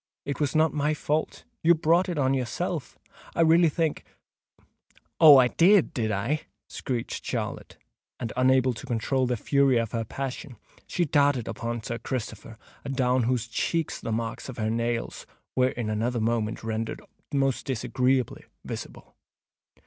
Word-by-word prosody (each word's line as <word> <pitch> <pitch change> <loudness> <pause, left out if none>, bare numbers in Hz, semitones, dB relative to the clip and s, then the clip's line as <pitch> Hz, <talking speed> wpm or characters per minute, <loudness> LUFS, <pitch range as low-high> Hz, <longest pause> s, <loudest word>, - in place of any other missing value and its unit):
"It 140 -2 -4
was 145 -1 0
not 155 0 +3
my 150 0 0
fault—you 165 +5 0
brought 165 +4 +2
it 175 - -3
on 135 -2 +2
yourself—I 130 +5 -4
really 165 +1 +5
think——" 160 0 -1 1.2
"Oh! 155 -4 +10
I 130 -1 +6
did, 185 +5 +4
did 110 -3 -1
I?" 115 +10 -2 0.2
screeched 120 -3 -4
Charlotte; - - -4 0.4
and, 115 - -4
unable 130 0 +3
to 120 +4 -10
control 125 +2 0
the 125 -1 0
fury 140 +2 +3
of 115 -2 -1
her 115 -1 -1
passion, 130 +1 -6 0.3
she 175 - 0
darted 140 -5 +2
upon 115 +1 -4
Sir 115 +1 -4
Christopher, 115 -2 -5 0.3
adown 130 -2 +1
whose 120 -1 0
cheeks 165 +7 -2
the 115 - -4
marks 115 +3 -3
of 130 - -8
her 110 -1 -1
nails 115 0 -2 0.3
were 130 0 +3
in 120 -3 -4
another 115 +3 -1
moment 110 -1 -1
rendered 110 0 -3 0.3
most 135 -3 0
disagreeably 130 0 0 0.2
visible. - - -8
130 Hz, 145 wpm, -26 LUFS, 115-145 Hz, 1.2 s, Oh